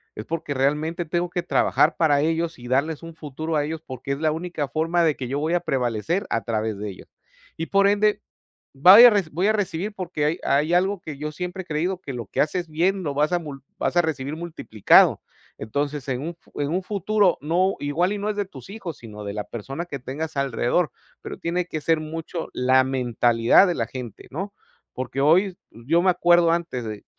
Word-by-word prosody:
es 110 - -7
porque 165 -3 -3
realmente 150 +5 0
tengo 175 +2 -1
que 175 0 -3
trabajar - - +2
para 145 -4 +3
ellos 165 +2 -1
y 120 0 -10
darles 145 +5 0
un 165 0 -8
futuro 155 +1 -5
a 145 - +1
ellos, 160 +1 -5
porque 130 +2 -5
es 140 - -5
la 155 0 +1
única 160 -2 -3
forma 165 +2 +1
de 155 -3 +2
que 130 - -5
yo 135 +3 -2
voy 155 +3 -1
a 175 - +3
prevalecer 135 - -1
a 115 - 0
través 110 -2 -2
de 105 +1 -5
ellos. 95 - -11 0.5
Y 165 - -1
por 200 0 +4
ende, 205 +1 +2 0.5
vaya 185 - +9
a - - +5
re 205 -2 +2
voy 175 +6 0
a 215 - +4
recibir 205 -1 -2
porque 180 -6 -3
hay 155 +4 0
hay 150 +4 +1
algo 190 +2 +1
que 150 -3 -7
yo 150 +1 -4
siempre 180 +3 -5
he - - -21
creído, 175 +3 -2
que 140 - -7
lo 120 -1 -5
que - - -2
haces 175 +3 0
bien 180 +5 0
lo 145 -5 -2
vas 150 +2 +2
a 175 - +3
mul 145 -5 -9 0.2
vas - - -1
a - - +6
recibir 150 -2 -3
multiplicado. 160 - +3 0.4
Entonces, 140 +5 -3
en 130 0 -2
un 155 - -3
f 170 - -16
en 145 - -1
un 180 +3 0
futuro 200 -1 +1
no, 180 +6 +1
igual 160 +7 0
y - - -4
no 205 +1 -3
es 210 - -4
de 205 - 0
tus 140 -2 -12
hijos, 195 - -7
sino 105 -2 -10
de 100 0 -5
la 105 -1 -3
persona 135 +8 -6
que 145 -5 -6
tengas 140 +5 -6
alrededor, 140 +4 0 0.3
pero - - -7
tiene 175 +1 -2
que 155 -3 -4
ser 160 +1 +2
mucho 165 +2 -5
la 130 +1 +4
mentalidad 120 - +3
de 175 - 0
la 115 - -1
gente, 120 -3 -9
¿no? 195 +8 -5 0.4
Porque 130 +1 -4
hoy, 180 +6 +3
yo 130 +10 0
me 190 - +2
acuerdo 175 -1 +4
antes 165 -8 -2
de 105 -2 -7
160 Hz, 220 wpm, -23 LUFS, 135-175 Hz, 0.5 s, vaya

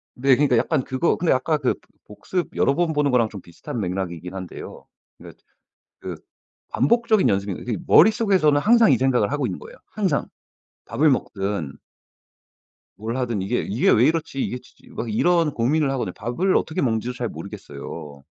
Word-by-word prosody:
네 130 +1 +4
그러니까 140 -3 +2
약간 140 +3 +1
그거 130 +7 0
근데 170 - 0
아까 150 +5 +1
그 135 -4 0 0.3
복습 170 - -4
여러 140 - +2
번 170 -1 0
보는 145 -2 +1
거랑 115 -3 +3
좀 100 -3 -9
비슷한 85 +8 -8
맥락이긴 90 -2 -4
한데요. 95 -2 -8 0.4
그 - - -11 0.7
그 - - -6 0.6
반복적인 220 - +2
연습이 100 0 0
그러니까 105 +2 -5
머릿속에서는 190 -7 +4
항상 230 +4 +5
이 - - +5
생각을 125 -5 +1
하고 145 0 0
있는 - - -4
거예요 475 +2 -12
항상. 200 -4 -1 0.6
밥을 155 +1 +2
먹든 100 - -2 1.2
뭘 115 +4 -4
하든 120 -6 -1
'이게 100 +6 -1
이게 105 +5 0
왜 115 - +5
이렇지 155 -3 -1
이게 125 - -3
치 125 - -22
치.' - - -22
막 115 - -4
이런 170 +5 +2
고민을 140 +5 +1
하거든요. 125 -9 -3
밥을 125 - -1
어떻게 160 - 0
먹는지도 120 -1 -1
잘 125 -2 -4
모르겠어요. 75 -7 -9
125 Hz, 365 characters per minute, -22 LUFS, 105-160 Hz, 1.2 s, 항상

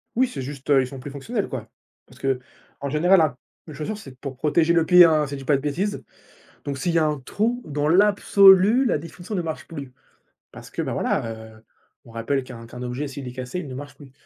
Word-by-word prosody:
Oui, 255 +3 +3
c'est 135 - -6
juste, 140 +1 -8
heu, 140 -2 +6
ils 130 - -2
sont 135 0 -9
plus 140 - -8
fonctionnels, 200 - -3
quoi, 115 -4 -6 0.4
parce 130 +1 -19
qu'en 135 +1 -5
général, 175 +6 +4
ap 145 -5 +1 0.3
une 155 - -9
chaussure, 155 +9 -4
c'est 135 -11 -12
pour 135 -2 -7
protéger 160 +4 +2
le 165 -1 +3
pied, 180 0 +8
hein. 155 -2 +3
Si 140 - -7
je 135 - -7
dis - - -9
pas 145 +1 +3
de - - -7
bêtises, 180 +9 -2 0.6
donc 140 -2 -4
s'il 170 +5 -1
y 165 - +4
a 155 - +2
un 150 -2 -1
trou, 225 - -1
dans 145 -1 -1
l'absolu, 200 +4 +6
la 235 - +2
définition 170 +6 -8
ne 180 - 0
marche 160 -2 -5
plus, 140 -5 -8 0.6
parce - - -12
que, - - -4
bah, - - -3
voilà, 115 - -1 0.3
heu, 110 - -21 0.4
on 115 - -15
rappelle 115 +4 -1
qu'un 120 -2 -10
qu'un 125 +2 -10
objet, 125 +4 -3
s'il 135 -1 -7
est - - -5
cassé, 130 +6 -5
il 170 - -6
ne 130 - -7
marche 145 +2 -8
plus. 140 -3 -15
145 Hz, 240 wpm, -23 LUFS, 135-175 Hz, 0.6 s, pied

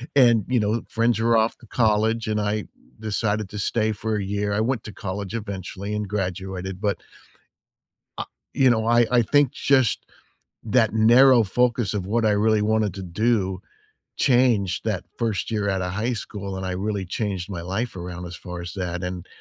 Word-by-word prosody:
and, 120 -6 +5
you 125 -1 +2
know, 105 -1 +1
with 115 +1 -2
friends 115 0 +1
were 115 +1 +3
off 110 +1 +1
to - - -16
college 110 0 +1
and 105 0 0
I 105 0 -1 0.3
decided 105 -1 -1
to 105 - -7
stay 110 +2 +1
for 110 +1 -2
a 100 - -2
year, 100 +1 -1
I 100 - 0
went 120 0 -1
to 105 - -8
college 100 0 -5
eventually 100 -1 -5
and 105 -1 -2
graduated, 95 -1 -4
but 100 -3 +1 1.2
Ah - - -3 0.3
you 130 -1 +4
know, 110 -2 +2
I 120 0 +5
I 125 -1 +5
think 145 +3 +3
just 130 -5 +2 0.6
that 110 0 +2
narrow 120 +3 +6
focus 120 0 +1
of 100 -3 -2
what 110 +3 +1
I 110 - +4
really 105 +1 +3
wanted 105 -2 +1
to 95 - -6
do 95 0 0 0.6
changed 120 -8 +2
that - - -2
first 110 -4 -1
year 105 -2 0
outta 95 -2 -1
high 105 +7 -1
school 100 -4 -5
and 95 - -4
I 95 - -2
really 100 +1 -2
changed 95 0 -3
my 90 -3 -4
life 95 +6 -3
around 90 0 -6
as 85 0 -7
far 90 -1 -7
as 85 -2 -6
that 90 -1 -3
and 90 -1 -5
105 Hz, 190 wpm, -24 LUFS, 95-115 Hz, 1.2 s, narrow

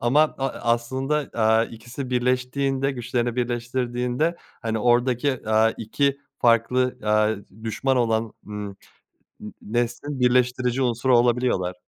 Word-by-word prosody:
ama 125 +6 +3 0.2
a 135 - 0
a 120 -2 -1
aslında, 135 +5 -1
aaa, 110 0 +3
ikisi 120 +4 -8
birleştiğinde 130 +2 0
güçlerini 120 -1 -2
birleştirdiğinde, 125 +5 -1 0.3
hani, 110 -1 -1
oradaki, 125 +1 +1
aaa, 110 +1 +4
2 140 +5 0 0.2
farklı, 125 +2 +2
aaa, 105 0 +3
d 110 0 -7
düşman 130 +4 0
olan, 115 -2 +1
ımm, 105 -1 -5 0.7
n 105 - -8
neslin 120 +5 -2
birleştirici 125 +1 +2
unsuru 120 0 +3
olabiliyorlar. 120 -7 +1
120 Hz, 120 wpm, -24 LUFS, 115-130 Hz, 0.7 s, aaa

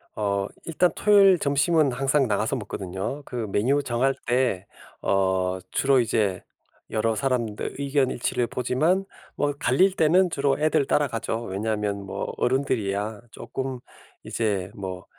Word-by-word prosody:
어 100 -1 -1 0.2
일단 175 +2 +2
토요일 200 -3 +6
점심은 145 +1 +2
항상 135 +2 +1
나가서 110 +4 0
먹거든요. 100 +3 -5
그 120 -3 -4
메뉴 135 +9 +2
정할 130 +2 +1
때 120 -6 +1 0.4
어 95 -1 +1
주로 135 -1 +3
이제 105 -5 0 0.5
여러 110 +1 0
사람들 120 -4 -2
의견 140 -1 +1
일치를 120 0 -1
보지만 155 +10 0 0.3
뭐 145 0 0
갈릴 180 +8 +3
때는 175 +3 +4
주로 140 -3 0
애들 155 -2 +2
따라가죠. 115 -5 0
왜냐하면 105 0 -2
뭐 - - -4
어른들이야 110 -5 -1
쪼끔 130 +2 -5 0.4
이제 100 -4 -1
뭐 95 -2 -6
125 Hz, 275 characters per minute, -25 LUFS, 105-140 Hz, 0.5 s, 토요일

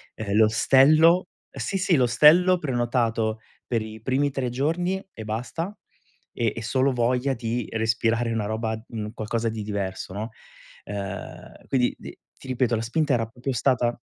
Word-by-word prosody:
Ehm, 105 -2 -3
l'ostello 155 +10 +5 0.2
sì, 195 - -3
sì, 180 -4 +2
l'ostello 155 +9 +5
prenotato 120 -5 0 0.3
per 115 -3 0
i 110 0 -8
primi 135 +4 +1
3 130 -2 -2
giorni 175 +9 -1
e 110 - -8
basta 145 - -4 0.6
e 115 -3 -1
e 115 - -5
solo 130 +4 +1
voglia 125 +3 +1
di 115 -1 -3
respirare 115 +1 0
una 110 -2 -1
roba, 110 +1 -2
mhmm, 105 -2 -5
qualcosa 115 0 -2
di 110 -1 -5
diverso, 100 -3 -4
no, 110 +3 -4 0.6
ehm, 100 -1 -7
quindi 125 -2 +1
t - - -9 0.3
ti - - -12
ripeto, 125 -2 0
la - - -2
spinta 145 +6 0
era 115 -2 +1
proprio 125 +4 -5
stata 120 -1 +1
120 Hz, 155 wpm, -25 LUFS, 110-135 Hz, 0.6 s, l'ostello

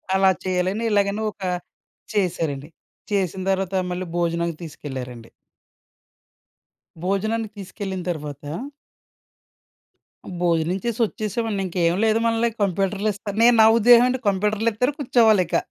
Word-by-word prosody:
అలా 190 0 +5
చేయాలని 185 +4 -1
ఇలాగని 200 +1 +1
ఒక - - -27 0.7
చేశారండి. 165 -6 -1 0.4
చేసిన 190 -1 0
తర్వాత 195 0 -1 0.2
మళ్ళీ 180 +1 -3
భోజనానికి 170 -1 -1
తీసుకెళ్లారండి. 130 -6 -8 1.8
భోజనానికి 215 +3 -1
తీసుకెళ్ళిన 190 -1 -5
తరువాత. 150 -4 -5 2.0
భోజనం 170 +1 +1
చేసి 235 -1 -2
వచ్చేసామండి. 215 -1 -3
ఇంకేం 170 -1 +1
లేదు. 220 0 +3
మనల్ని 230 0 +2
కంప్యూటర్‌లు 195 +2 0
ఇస్తారు. 205 +1 -7
నేను 240 0 +6
నా 220 - +8
ఉద్దేశం 240 +2 +7
ఏంటి 255 - -1
కంప్యూటర్‌లిత్తరు, 215 +5 0
కూర్చోవాలి 225 -7 +4
ఇక. - - +1
195 Hz, 105 wpm, -23 LUFS, 175-220 Hz, 2.0 s, నా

